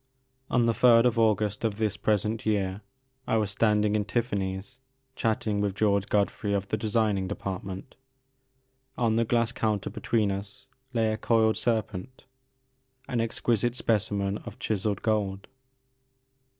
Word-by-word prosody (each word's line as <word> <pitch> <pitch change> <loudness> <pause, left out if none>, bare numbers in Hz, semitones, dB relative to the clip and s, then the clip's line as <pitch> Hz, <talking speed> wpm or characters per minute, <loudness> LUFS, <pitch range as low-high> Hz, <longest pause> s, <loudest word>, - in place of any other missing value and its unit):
On 120 -2 +3
the 115 - +3
third 115 +1 +6
of 120 -2 +2
August 105 -2 +2
of 110 -3 0
this 110 -2 0
present 110 +1 0
year 100 -2 0 0.5
I 115 - +2
was 105 -2 0
standing 105 0 +2
in 105 - +1
Tiffany's, 100 0 -3 0.4
chatting 110 -2 0
with 100 -2 -1
George 100 -1 +2
Godfrey 100 0 0
of 100 0 -1
the - - +1
designing 105 -3 0
department. 95 +4 -5 1.0
On 115 -2 +2
the 115 +1 +2
glass 115 0 +1
counter 105 -3 -1
between 110 -4 0
us 100 +1 -6 0.3
lay 110 -3 +1
a - - -3
coiled 110 -1 +3
serpent, 115 +1 -2 0.8
an 120 -2 0
exquisite 115 +1 0
specimen 100 -4 0
of - - -10
chiselled 105 -2 -2
gold. 100 -3 -1
105 Hz, 135 wpm, -27 LUFS, 100-115 Hz, 1.0 s, third